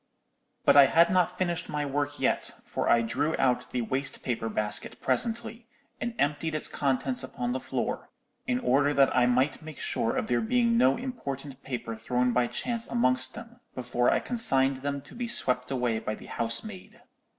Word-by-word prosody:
"But -, -, +6 dB
I 140 Hz, -1 st, +9 dB
had 170 Hz, +4 st, +4 dB
not 185 Hz, -2 st, +2 dB
finished 175 Hz, -2 st, -2 dB
my 150 Hz, -1 st, -2 dB
work 145 Hz, +1 st, -2 dB
yet; -, -, +1 dB, 0.2 s
for -, -, -2 dB
I 115 Hz, 0 st, +4 dB
drew 145 Hz, +7 st, -1 dB
out 125 Hz, -2 st, +1 dB
the 125 Hz, -1 st, -2 dB
waste 135 Hz, +4 st, -3 dB
paper 115 Hz, -2 st, -2 dB
basket 105 Hz, -1 st, -3 dB
presently, 225 Hz, -, 0 dB, 0.3 s
and 235 Hz, -1 st, -3 dB
emptied 150 Hz, +2 st, 0 dB
its 155 Hz, -, +2 dB
contents 145 Hz, -, -1 dB
upon 120 Hz, 0 st, -4 dB
the 130 Hz, -, -1 dB
floor, -, -, -3 dB, 0.4 s
in 125 Hz, -, +1 dB
order 140 Hz, +3 st, +2 dB
that 135 Hz, -1 st, +4 dB
I 125 Hz, -1 st, +4 dB
might 130 Hz, +3 st, +1 dB
make 155 Hz, -2 st, -10 dB
sure 115 Hz, -, -1 dB
of -, -, 0 dB
there 120 Hz, -1 st, +1 dB
being 235 Hz, -, +2 dB
no 135 Hz, -, +4 dB
important 140 Hz, -, -6 dB
paper 120 Hz, -4 st, -5 dB
thrown 125 Hz, +2 st, 0 dB
by 125 Hz, 0 st, +2 dB
chance 235 Hz, -, -4 dB
amongst 130 Hz, -, 0 dB
them, 235 Hz, +1 st, -11 dB, 0.2 s
before 125 Hz, -1 st, +1 dB
I -, -, +3 dB
consigned 135 Hz, -, +2 dB
them 140 Hz, +1 st, -3 dB
to -, -, -15 dB
be 240 Hz, 0 st, -4 dB
swept 125 Hz, -, +2 dB
away 125 Hz, -4 st, 0 dB
by 110 Hz, -, -4 dB
the -, -, -13 dB
housemaid. 150 Hz, -, -3 dB
135 Hz, 185 wpm, -28 LUFS, 125-180 Hz, 0.4 s, I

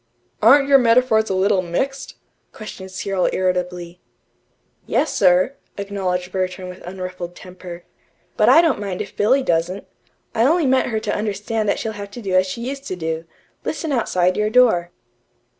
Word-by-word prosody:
"Aren't 275 Hz, +6 st, +6 dB
your 275 Hz, -1 st, +6 dB
metaphors 230 Hz, -2 st, +3 dB
a 190 Hz, -, 0 dB
little 190 Hz, 0 st, +2 dB
mixed?" 265 Hz, +11 st, -3 dB, 0.4 s
questioned 195 Hz, -3 st, -9 dB
Cyril 190 Hz, 0 st, -1 dB
irritably. 180 Hz, -1 st, -2 dB, 0.9 s
"Yes, -, -, +1 dB
sir," 185 Hz, +5 st, +3 dB, 0.2 s
acknowledged 185 Hz, -3 st, -3 dB
Bertram 185 Hz, 0 st, -3 dB
with 180 Hz, +1 st, -10 dB
unruffled 185 Hz, -1 st, -7 dB
temper, 180 Hz, -2 st, -10 dB, 0.5 s
"but -, -, +4 dB
I 330 Hz, -, +7 dB
don't 320 Hz, -9 st, +1 dB
mind 195 Hz, -3 st, -3 dB
if -, -, -14 dB
Billy 260 Hz, +6 st, +3 dB
doesn't. 175 Hz, +1 st, -1 dB, 0.5 s
I 225 Hz, -, 0 dB
only 320 Hz, +5 st, +3 dB
meant 260 Hz, -1 st, +2 dB
her 220 Hz, -2 st, -1 dB
to 215 Hz, -1 st, -2 dB
understand 210 Hz, +1 st, -2 dB
that -, -, +1 dB
she'd 220 Hz, -, -3 dB
have 205 Hz, -1 st, -8 dB
to 240 Hz, +4 st, -9 dB
do 190 Hz, -2 st, -3 dB
as 185 Hz, 0 st, +4 dB
she 235 Hz, +6 st, -5 dB
used 275 Hz, +1 st, -6 dB
to 185 Hz, -, -3 dB
do 160 Hz, -1 st, -4 dB, 0.4 s
listen 320 Hz, -, -3 dB
outside 185 Hz, -8 st, +1 dB
your 210 Hz, 0 st, +1 dB
door." 220 Hz, -8 st, +4 dB
195 Hz, 165 wpm, -20 LUFS, 180-230 Hz, 0.9 s, I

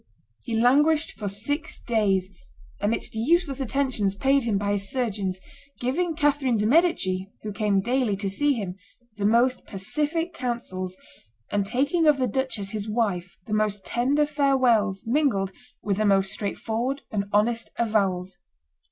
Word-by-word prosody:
He 235 Hz, -3 st, -4 dB
languished 295 Hz, +6 st, +3 dB
for 205 Hz, -2 st, -5 dB
six 255 Hz, +10 st, -1 dB
days, 195 Hz, -5 st, +1 dB, 0.5 s
amidst 210 Hz, +3 st, -1 dB
useless 275 Hz, +4 st, +1 dB
attentions 255 Hz, -7 st, 0 dB
paid 270 Hz, +4 st, +2 dB
him 215 Hz, -4 st, +1 dB
by 205 Hz, 0 st, -1 dB
his 200 Hz, -1 st, -1 dB
surgeons, 205 Hz, -7 st, -2 dB, 0.4 s
giving 320 Hz, +7 st, -1 dB
Catherine 285 Hz, -5 st, +2 dB
de' 210 Hz, -, 0 dB
Medici, 215 Hz, -, +2 dB
who 215 Hz, -, -4 dB
came 200 Hz, -1 st, +1 dB
daily 245 Hz, -1 st, +1 dB
to 200 Hz, 0 st, -2 dB
see 285 Hz, +9 st, +2 dB
him, 200 Hz, -6 st, -4 dB, 0.4 s
the 205 Hz, -1 st, +1 dB
most 245 Hz, +3 st, +3 dB
pacific 300 Hz, -, -2 dB
counsels, 185 Hz, -, -4 dB, 0.5 s
and 200 Hz, -1 st, 0 dB
taking 285 Hz, -, +1 dB
of 300 Hz, -2 st, +5 dB
the 260 Hz, -, +1 dB
duchess 245 Hz, -5 st, -2 dB
his 215 Hz, 0 st, -4 dB
wife 200 Hz, -6 st, -1 dB
the 215 Hz, -, -5 dB
most 210 Hz, -2 st, 0 dB
tender 275 Hz, +5 st, +2 dB
farewells 255 Hz, -9 st, +2 dB
mingled 230 Hz, -7 st, +1 dB, 0.3 s
with 200 Hz, -2 st, 0 dB
the 215 Hz, -, +1 dB
most 195 Hz, -1 st, +3 dB
straightforward 230 Hz, +6 st, -3 dB
and 200 Hz, -3 st, -1 dB
honest 225 Hz, +2 st, +1 dB
avowals. 190 Hz, -5 st, 0 dB
225 Hz, 145 wpm, -25 LUFS, 200-270 Hz, 0.5 s, of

